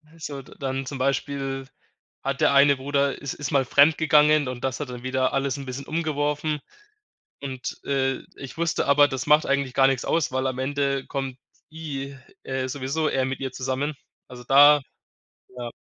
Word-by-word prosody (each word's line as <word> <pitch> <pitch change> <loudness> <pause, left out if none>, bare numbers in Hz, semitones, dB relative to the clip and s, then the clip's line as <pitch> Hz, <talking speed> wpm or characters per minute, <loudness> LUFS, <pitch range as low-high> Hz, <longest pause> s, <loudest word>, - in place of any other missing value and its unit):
es 165 - -9
sollte 140 -2 -8
dann 135 -1 -3
zum 135 +1 -6
Beispiel 135 0 -2 0.6
hat 135 0 -2
der - - +4
eine 140 0 +6
Bruder 140 +1 -1
is 140 - -4
ist 145 - -5
mal 140 -2 +3
fremdgegangen 150 +1 +4
und 125 0 -6
das 130 +1 -2
hat 145 - -4
dann 125 -1 -8
wieder 130 0 0
alles 135 -1 0
'n 140 -1 -8
bisschen 130 +2 -6
umgeworfen 150 -1 -1 0.8
und, 130 -2 -5
äh, 135 -1 0 0.2
ich 135 -2 -9
wusste 170 -1 0
aber, 145 +1 +5
das 130 -2 -4
macht 150 +1 +5
eigentlich 140 -2 0
gar 135 0 +5
nix 135 -2 -1
aus, 165 -5 +1
weil 130 0 0
am 130 -1 -2
Ende 140 0 -1
kommt 135 -2 -4 0.3
i 140 -4 -6 0.3
äh, 130 -1 -2
sowieso 140 +4 -1
er 130 -2 0
mit 135 +1 -4
ihr 135 -1 -4
zusammen. 135 +3 -2 0.3
Also, 125 -1 -10
da 145 +3 +7 0.8
ja. 120 -1 -5
135 Hz, 180 wpm, -24 LUFS, 130-145 Hz, 0.8 s, da